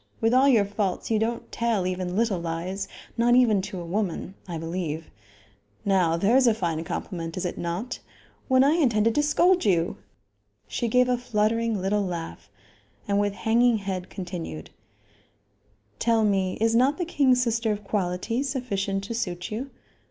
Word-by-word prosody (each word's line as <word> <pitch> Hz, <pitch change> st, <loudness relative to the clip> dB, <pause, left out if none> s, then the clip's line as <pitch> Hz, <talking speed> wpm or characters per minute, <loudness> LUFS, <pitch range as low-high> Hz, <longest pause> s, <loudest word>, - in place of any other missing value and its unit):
With 225 Hz, +1 st, +2 dB
all 260 Hz, +2 st, +5 dB
your 225 Hz, -6 st, +4 dB
faults, 200 Hz, 0 st, -2 dB
you 220 Hz, -, +3 dB
don't 230 Hz, +2 st, -2 dB
tell 230 Hz, -5 st, 0 dB
even 185 Hz, 0 st, -2 dB
little 215 Hz, -4 st, +1 dB
lies; 175 Hz, +4 st, -4 dB, 0.3 s
not 240 Hz, +1 st, +4 dB
even 225 Hz, -6 st, +4 dB
to 190 Hz, -1 st, -6 dB
a 170 Hz, -, -6 dB
woman 190 Hz, 0 st, -2 dB
I 170 Hz, -2 st, -4 dB
believe. 165 Hz, -1 st, -4 dB, 0.7 s
Now 180 Hz, -4 st, +3 dB
there 200 Hz, +8 st, +3 dB
is 260 Hz, -1 st, +5 dB
a 225 Hz, -, +4 dB
fine 165 Hz, -6 st, -2 dB
compliment 165 Hz, 0 st, -5 dB
is 185 Hz, -, -2 dB
it 175 Hz, -, -2 dB
not? 180 Hz, +9 st, -4 dB, 0.5 s
when 260 Hz, -1 st, +5 dB
I 280 Hz, -, +4 dB
intended 230 Hz, -9 st, +2 dB
to 295 Hz, -, +2 dB
scold 350 Hz, +5 st, +3 dB
you!" 175 Hz, -4 st, +1 dB, 0.7 s
She 240 Hz, -, -2 dB
gave 250 Hz, +2 st, +3 dB
a 250 Hz, -1 st, +1 dB
fluttering 230 Hz, -1 st, 0 dB
little 200 Hz, +2 st, 0 dB
laugh, 165 Hz, -, -6 dB, 0.6 s
and, 200 Hz, 0 st, +2 dB
with 205 Hz, -1 st, +1 dB
hanging 230 Hz, +3 st, +3 dB
head, 190 Hz, -3 st, -4 dB
continued: 175 Hz, -, -6 dB, 1.3 s
"Tell 230 Hz, -1 st, +2 dB
me, 195 Hz, -3 st, +1 dB
is 225 Hz, +1 st, +2 dB
not 260 Hz, +5 st, +3 dB
the 355 Hz, -, -1 dB
king's 265 Hz, -6 st, +3 dB
sister 230 Hz, -1 st, 0 dB
of 210 Hz, 0 st, -3 dB
quality 195 Hz, +4 st, -1 dB
sufficient 205 Hz, -8 st, -2 dB
to 205 Hz, -, -5 dB
suit 180 Hz, -6 st, -3 dB
you? 245 Hz, +6 st, -4 dB
205 Hz, 165 wpm, -25 LUFS, 180-235 Hz, 1.3 s, all